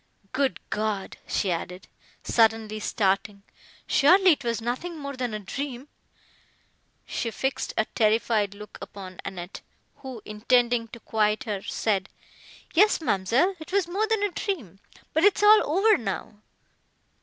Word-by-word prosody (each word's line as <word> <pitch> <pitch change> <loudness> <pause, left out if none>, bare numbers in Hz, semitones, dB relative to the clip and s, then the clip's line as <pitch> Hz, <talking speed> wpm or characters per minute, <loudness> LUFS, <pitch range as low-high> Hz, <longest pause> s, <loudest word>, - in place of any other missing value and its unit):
Good 265 +1 0
God!" 210 -2 -2
she 190 - 0
added, 180 +2 -5 0.4
suddenly 220 -2 +2
starting—"surely 215 - +2
it 290 - 0
was 235 -1 -1
nothing 255 +9 -4
more 280 -2 -6
than 250 -2 -2
a 215 - -3
dream!" 265 +6 -6 1.2
She 230 - -3
fixed 265 +4 -2
a 220 - +3
terrified 215 -2 +1
look 210 +1 -11
upon 185 -2 -9
Annette, 180 0 -7 0.4
who, 260 -5 -9
intending 235 +2 +2
to 235 - -11
quiet 215 -1 +1
her, 205 -4 -3
said 200 -2 -1 0.6
"Yes, 415 +6 +5
ma'amselle, 255 - +2
it 315 +2 -10
was 390 -3 +2
more 400 +5 0
than 440 -2 +1
a 410 - +1
dream, 270 - -4 0.3
but 320 - +2
it 410 -1 +5
is - - -1
all 425 -5 +7
over 410 +6 +5
now." 205 -1 -5
230 Hz, 140 wpm, -26 LUFS, 210-310 Hz, 1.2 s, all